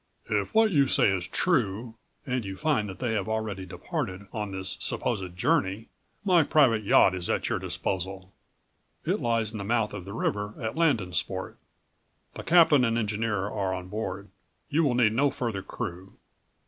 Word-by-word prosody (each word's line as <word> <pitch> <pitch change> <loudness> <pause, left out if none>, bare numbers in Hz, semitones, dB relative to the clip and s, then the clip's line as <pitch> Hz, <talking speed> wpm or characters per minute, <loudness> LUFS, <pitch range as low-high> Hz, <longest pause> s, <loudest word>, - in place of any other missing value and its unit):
"If - - 0
what 220 -1 +5
you 140 -5 +4
say 105 - +3
is 90 -2 -3
true, 115 - 0 0.3
and 125 -2 -1
you 95 -1 -6
find 145 -10 0
that 95 - -8
they 120 -3 -1
have 105 -1 -1
already 110 -4 -3
departed 95 +2 -4
on 105 -2 -3
this 95 0 -3
supposed 95 -7 -2
journey, 95 +4 0 0.4
my 180 -4 +5
private 135 -7 +4
yacht 100 -2 +5
is 90 -1 -4
at - - 0
your - - 0
disposal.111 95 0 -6
It - - -2
lies 115 -2 0
in 110 - -6
the - - -4
mouth 110 0 0
of 95 -4 -6
the 100 - -7
river 105 -1 -2
at 110 -2 -3
Landensport. 125 - 0 0.8
The - - -7
captain 165 -6 +6
and 115 -1 +1
engineer 105 -2 -1
are 95 -3 -2
on 90 0 -7
board. 100 -1 -4 0.4
You 160 +3 +3
will 135 -5 +2
need 115 -3 +4
no 140 +5 +3
further 115 -7 -3
crew. 90 +1 -6
105 Hz, 175 wpm, -27 LUFS, 95-125 Hz, 0.8 s, captain